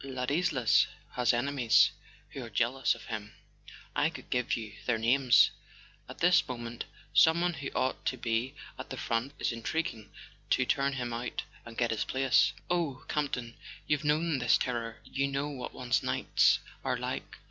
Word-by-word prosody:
"Ladislas 135 +1 +2 0.2
has 125 -1 +2
enemies 120 -1 +3 0.4
who 135 - -6
are 115 - -8
jealous 120 +4 +1
of - - -12
him 105 -2 -6 0.6
(I - - +3
could - - -11
give 125 -1 0
you 110 -3 -7
their 120 -2 +2
names); 120 +2 +5 0.6
at - - -9
this 180 +1 +4
moment 120 -2 -5 0.3
someone 170 +2 +5
who 140 -4 -5
ought 130 - 0
to 130 - 0
be 115 +2 -1 0.2
at - - -7
the - - -6
front 115 +4 -1
is - - 0
intriguing 115 -1 -3 0.4
to - - +3
turn 140 0 +1
him 120 -3 -3
out 120 +1 -4 0.2
and 115 - -11
get 120 -2 +1
his 110 - 0
place. 135 -1 +3
Oh, 165 -7 -1
Camp 150 -2 -1
ton, 120 -2 -4 0.3
you've 150 0 0
known 150 0 +1
this 120 -2 +4
terror—you 120 +3 -3
know 140 +1 -2
what 130 -4 -6
one's 125 0 0
nights - - +3 0.3
are - - 0
like - - -5
125 Hz, 165 wpm, -30 LUFS, 120-140 Hz, 0.6 s, names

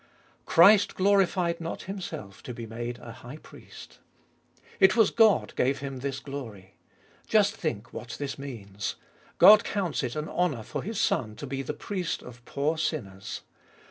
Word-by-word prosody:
Christ 200 +5 +6
glorified 185 -3 +2
not 165 - -5
Himself 175 - -7
to 125 - -7
be 115 - -6
made 120 +2 -5
a 115 - -10
High 120 +4 -10
Priest: - - -14 0.8
it 190 +1 +6
was 225 -3 +4
God 220 -3 +4
gave 135 +2 +1
Him 135 -1 -6
this 135 +1 -4
glory. 115 -10 -8 0.5
Just 210 0 +3
think 120 - -4
what 115 -1 -7
this 140 -2 -5
means. 105 -8 -5 0.4
God 210 0 +9
counts 185 -7 -2
it 125 -2 -3
an 155 0 -3
honour 160 -11 -1
for - - -5
His 220 0 -4
Son 110 -3 0
to 145 - -7
be 135 0 -3
the 140 +3 -4
Priest 180 0 -3
of 125 0 -12
poor 150 +3 -1
sinners. 100 - -4
140 Hz, 160 wpm, -27 LUFS, 120-180 Hz, 0.8 s, God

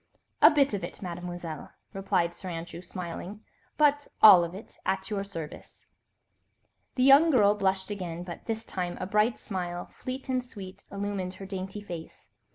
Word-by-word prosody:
"A 305 - +10
bit 285 -6 +3
of 195 -3 -2
it, 175 - -7
Mademoiselle," 175 -3 -6 0.2
replied 175 -3 0
Sir 185 +1 -7
Andrew, 170 0 -6
smiling, 185 +3 -7 0.4
"but 290 -1 +3
all 190 -5 +10
of 170 +1 -5
it, 205 - -11
at 190 +2 -1
your 200 -2 -1
service." 165 -6 -9 1.1
The 255 - +2
young 275 +5 +8
girl 210 -8 +5
blushed 190 -1 0
again, 175 -4 -4
but 175 -1 -8
this 225 -1 -2
time 180 -2 -3
a - - -2
bright 210 +4 +2
smile, 175 -3 -5
fleet 260 +2 -6
and 255 -1 0
sweet, 200 -7 -10
illumined 200 -2 -3
her 195 - -8
dainty 195 +1 -5
face. 170 -5 -9
190 Hz, 165 wpm, -28 LUFS, 175-215 Hz, 1.1 s, A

